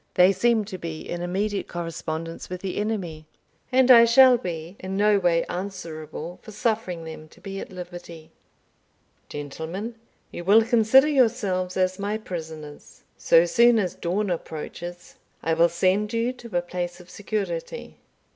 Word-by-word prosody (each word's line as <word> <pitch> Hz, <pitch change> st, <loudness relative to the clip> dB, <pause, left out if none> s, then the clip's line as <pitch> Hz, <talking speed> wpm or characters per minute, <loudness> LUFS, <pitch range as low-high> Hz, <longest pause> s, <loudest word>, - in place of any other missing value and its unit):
They 180 Hz, +1 st, +6 dB
seem 230 Hz, +1 st, +2 dB
to 190 Hz, -3 st, -7 dB
be 165 Hz, -2 st, -6 dB
in 175 Hz, -, -5 dB
immediate 195 Hz, +3 st, -2 dB
correspondence 165 Hz, -1 st, -5 dB
with 180 Hz, 0 st, -6 dB
the 190 Hz, -2 st, -4 dB
enemy, 185 Hz, -8 st, -3 dB, 0.4 s
and 260 Hz, 0 st, +5 dB
I 235 Hz, -2 st, +10 dB
shall 255 Hz, +2 st, +7 dB
be 170 Hz, -4 st, -5 dB
in 190 Hz, +1 st, -4 dB
no 210 Hz, 0 st, +4 dB
respect 175 Hz, -3 st, +1 dB
answerable 175 Hz, -3 st, -6 dB
for -, -, -13 dB
suffering 210 Hz, -5 st, -2 dB
them 160 Hz, -1 st, -9 dB
to -, -, -20 dB
be 195 Hz, -1 st, -6 dB
at -, -, -8 dB
liberty. 175 Hz, -3 st, -9 dB, 1.0 s
Gentlemen, 160 Hz, +10 st, -5 dB, 0.4 s
you 175 Hz, -, -6 dB
will 210 Hz, +5 st, +6 dB
consider 235 Hz, +4 st, +5 dB
yourselves 220 Hz, -10 st, +1 dB
as 185 Hz, 0 st, +1 dB
my 205 Hz, +2 st, -1 dB
prisoners. 160 Hz, -7 st, -9 dB
So 165 Hz, -, +5 dB
soon 235 Hz, +7 st, +5 dB
as 185 Hz, -5 st, 0 dB
dawn 190 Hz, +3 st, -1 dB
approaches, 175 Hz, +1 st, -6 dB, 0.3 s
I 165 Hz, -, +1 dB
will 170 Hz, +1 st, +4 dB
send 190 Hz, +5 st, +1 dB
you 230 Hz, +2 st, 0 dB
to 235 Hz, -7 st, -5 dB
a 175 Hz, -, 0 dB
place 175 Hz, 0 st, -4 dB
of 180 Hz, -, -14 dB
security. 200 Hz, -, -4 dB
185 Hz, 155 wpm, -25 LUFS, 170-215 Hz, 1.0 s, I